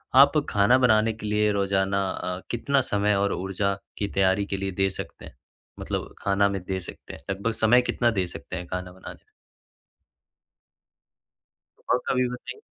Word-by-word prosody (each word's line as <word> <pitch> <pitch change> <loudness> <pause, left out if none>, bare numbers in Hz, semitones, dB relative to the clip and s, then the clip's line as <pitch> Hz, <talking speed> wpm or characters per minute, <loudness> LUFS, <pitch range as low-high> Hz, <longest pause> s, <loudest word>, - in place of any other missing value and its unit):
आप 140 +3 +7
खाना 105 +5 +4
बनाने 110 -3 +3
के 110 - -9
लिए 105 0 +2
रोज़ाना 100 -1 +1
अ, 90 0 -4
कितना 135 +3 +1
समय 105 -3 +1
और 100 0 +1
ऊर्जा 95 +2 -1 0.2
की 100 - -1
तैयारी 95 0 +2
के 100 - -3
लिए 95 0 -3
दे 95 +1 +1
सकते 95 - -8
हैं? - - -13 0.4
मतलब - - -4
खाना 100 0 +2
में 100 -1 -3
दे 95 -1 -1
सकते 90 - -10
हैं - - -9
लगभग 100 +4 -1
समय 115 +2 +4
कितना 120 -1 +1
दे 95 -5 -1
सकते - - -8
हैं 90 - -6
खाना 90 0 -5
बनाने 95 +1 -10
में? - - -37 2.6
और - - +3
कभी 125 -1 +2
बताई 125 - -8
100 Hz, 170 wpm, -25 LUFS, 95-115 Hz, 2.6 s, आप